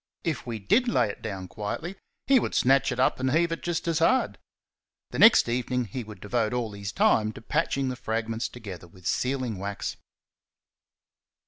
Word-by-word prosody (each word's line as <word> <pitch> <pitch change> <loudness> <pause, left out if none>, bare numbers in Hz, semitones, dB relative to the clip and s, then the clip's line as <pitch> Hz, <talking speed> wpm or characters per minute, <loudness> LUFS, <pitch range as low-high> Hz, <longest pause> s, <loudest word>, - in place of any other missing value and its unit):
If 155 -7 -2
we 115 -2 -3
DID 215 - +2
lay 235 - +2
it 100 - -7
down 95 -2 -5
quietly 105 - -5 0.3
he 270 -1 +5
would - - -3
snatch 135 +1 +4
it - - -3
up 130 - +2
and 130 0 +1
heave 165 +4 +2
it 165 - -2
out - - -25
just 175 -1 -2
as 165 -1 +1
hard. 260 +11 +2 0.7
The - - -4
next 225 - +7
evening 125 +1 -1
he 120 +4 -5
would 105 -2 -11
devote 110 +1 0
all 120 -3 -1
his 100 -1 -6
time 110 +4 +3
to - - -9
patching 140 -1 0
the 130 - -3
fragments 115 0 -2
together 100 -7 -9
with 90 +1 -18
sealing 125 -4 -1
wax. 100 +1 -4
120 Hz, 190 wpm, -27 LUFS, 105-150 Hz, 0.7 s, next